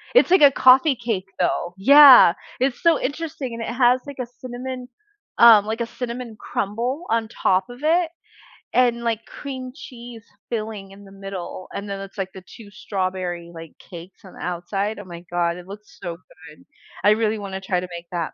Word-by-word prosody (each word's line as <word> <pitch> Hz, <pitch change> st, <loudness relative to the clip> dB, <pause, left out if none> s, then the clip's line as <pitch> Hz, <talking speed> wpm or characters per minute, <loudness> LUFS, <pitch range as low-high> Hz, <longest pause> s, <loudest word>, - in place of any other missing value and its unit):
It's 430 Hz, -, +5 dB
like 375 Hz, -, +6 dB
a 285 Hz, -, +9 dB
coffee 260 Hz, +2 st, +5 dB
cake, 225 Hz, -6 st, -3 dB
though. 175 Hz, 0 st, -1 dB
Yeah. 270 Hz, -, +9 dB, 0.3 s
It's 260 Hz, -1 st, -1 dB
so 335 Hz, -3 st, +4 dB
interesting 285 Hz, -4 st, -4 dB
and 230 Hz, -, -6 dB
it 230 Hz, -, -4 dB
has, 250 Hz, 0 st, +3 dB
like, 280 Hz, -, -8 dB
a 250 Hz, -, -2 dB
cinnamon, 255 Hz, 0 st, -7 dB, 0.5 s
um, 225 Hz, -3 st, +8 dB
like, 225 Hz, +2 st, -3 dB
a -, -, 0 dB
cinnamon 235 Hz, -1 st, -6 dB
crumble 240 Hz, -, -3 dB
on 225 Hz, -1 st, +1 dB
top 190 Hz, -3 st, 0 dB
of 245 Hz, +3 st, -11 dB
it 330 Hz, +2 st, +2 dB, 0.6 s
and, 240 Hz, -1 st, +2 dB
like, 230 Hz, -1 st, -2 dB
cream 260 Hz, -3 st, -7 dB
cheese 240 Hz, -5 st, -11 dB, 0.3 s
filling 215 Hz, -3 st, -5 dB
in 200 Hz, +1 st, -14 dB
the 195 Hz, -, -15 dB
middle. 195 Hz, -2 st, -8 dB
And 200 Hz, 0 st, -6 dB
then 200 Hz, 0 st, -4 dB
it's, 195 Hz, +1 st, -11 dB
like, 190 Hz, -1 st, -3 dB
the 190 Hz, -1 st, -11 dB
two 220 Hz, -3 st, -14 dB
strawberry, 185 Hz, -4 st, -4 dB
like, 165 Hz, -1 st, -10 dB
cakes 175 Hz, +3 st, -13 dB
on 190 Hz, -, -14 dB
the -, -, -14 dB
outside. 195 Hz, +5 st, -3 dB
Oh, -, -, -8 dB
my 170 Hz, -1 st, -10 dB
god, 170 Hz, 0 st, 0 dB
it 180 Hz, +1 st, -12 dB
looks 210 Hz, +2 st, -12 dB
so 170 Hz, -1 st, -5 dB
good, -, -, -17 dB, 0.4 s
I 205 Hz, -, +6 dB
really 220 Hz, 0 st, +1 dB
wanna 195 Hz, -1 st, -6 dB
try 185 Hz, -1 st, -1 dB
to 180 Hz, -, -6 dB
make 170 Hz, 0 st, -8 dB
that. 170 Hz, -3 st, -3 dB
220 Hz, 195 wpm, -22 LUFS, 190-250 Hz, 0.6 s, a